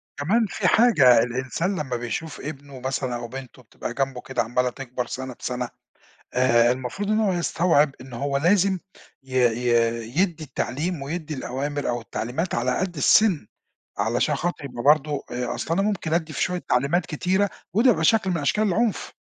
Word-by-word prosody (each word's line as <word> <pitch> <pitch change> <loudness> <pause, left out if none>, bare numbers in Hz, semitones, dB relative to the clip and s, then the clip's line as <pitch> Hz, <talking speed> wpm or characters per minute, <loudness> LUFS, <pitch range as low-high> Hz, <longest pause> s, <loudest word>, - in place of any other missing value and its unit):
كمان 210 +11 +2
في - - 0
حاجة، 145 - +6
الإنسان 130 - -2
لما 130 -5 -3
بيشوف 120 +7 -4
ابنه 140 -2 -8
مثلًا 130 -1 -2
أو 120 0 -5
بنته 130 +1 -9
بتبقى 115 - -7
جنبه 135 -1 -2
كده 130 -1 -2
عمّاله 125 +2 0
تكبر 125 -1 -5
سنة 130 0 -5
بسنة، 125 -1 -3 0.7
آآ 120 -1 +4
المفروض 130 +12 -4
إنه 215 -1 +2
هو 190 - +2
يستوعب 165 -4 +2
إنه 125 -2 -9
هو 140 +2 -1
لازم 190 +5 +3 0.4
ي 130 -1 -11
ي 120 -1 +2 0.5
يدّي 170 -5 0
التعليم، 145 +4 -3
ويدّي 155 +2 -4
الأوامر 145 +2 -3
أو 120 0 -1
التعليمات 125 +9 -3
على 125 +2 0
قد 185 -2 -2
السن، 170 - +4 0.5
علشان 120 +8 +1
خاطر 175 0 -3
يبقى 125 -3 -6
برضه 150 0 +3
آآ، 125 0 -2
أصل 165 - -2
أنا 195 - +1
ممكن 200 -6 -1
أدِّي 160 -2 -1
في - - -2
شوية 180 0 -1
تعليمات 140 +8 +2
كتيرة، 190 +5 0 0.2
وده 235 +5 +5
بيبقى 160 -8 +1
شكل 215 0 +3
من 170 - 0
أشكال 210 +9 +1
العنف. 220 +3 0
140 Hz, 170 wpm, -24 LUFS, 125-175 Hz, 0.7 s, حاجة